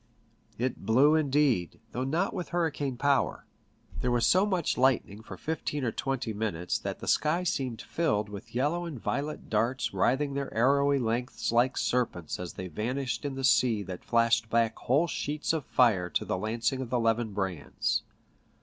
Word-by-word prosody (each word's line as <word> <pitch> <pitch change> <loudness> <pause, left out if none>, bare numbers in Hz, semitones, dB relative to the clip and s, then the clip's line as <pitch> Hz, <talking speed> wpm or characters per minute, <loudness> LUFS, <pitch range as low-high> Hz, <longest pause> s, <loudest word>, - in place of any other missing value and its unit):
It 125 +1 -2
blew, 135 +7 +5
indeed, 140 - +2
though 125 - -2
not 165 +9 0
with 180 -3 -4
hurricane 145 -6 -1
power. 140 +1 +1 0.5
There 125 - 0
was 120 -1 +2
so 185 +8 +4
much 185 -6 0
light 130 -1 +3
ning 100 +2 -12
for 110 - -10
fifteen 150 -2 -3
or 120 - 0
twenty 125 -2 -2
minutes 100 -5 -2
that - - -5
the - - -7
sky 160 +4 +2
seemed 130 -9 -2
filled 125 -11 0
with 105 +3 -10
yellow 150 +7 0
and 155 -7 -6
violet 145 +7 -3
darts 115 +4 0
writhing 140 +2 +1
their 140 0 -3
arrowy 140 +4 +3
lengths 120 -1 -1
like 120 +3 +2
serpents 115 -10 -1
as 90 -2 -5
they 95 - -6
vanished 125 - -3
in 140 -2 -3
the 135 - -5
sea 120 -4 +3
that 90 -1 -7
flashed 115 -1 +2
back 115 -1 +2
whole 140 +7 +2
sheets 150 -1 -2
of 155 -4 -2
fire 105 -8 +3
to - - -1
the - - -1
lancing 115 +7 -1
of 125 - -5
the 125 0 +1
levin 115 -1 +1
brands. 95 -6 -1
125 Hz, 175 wpm, -29 LUFS, 110-145 Hz, 0.5 s, blew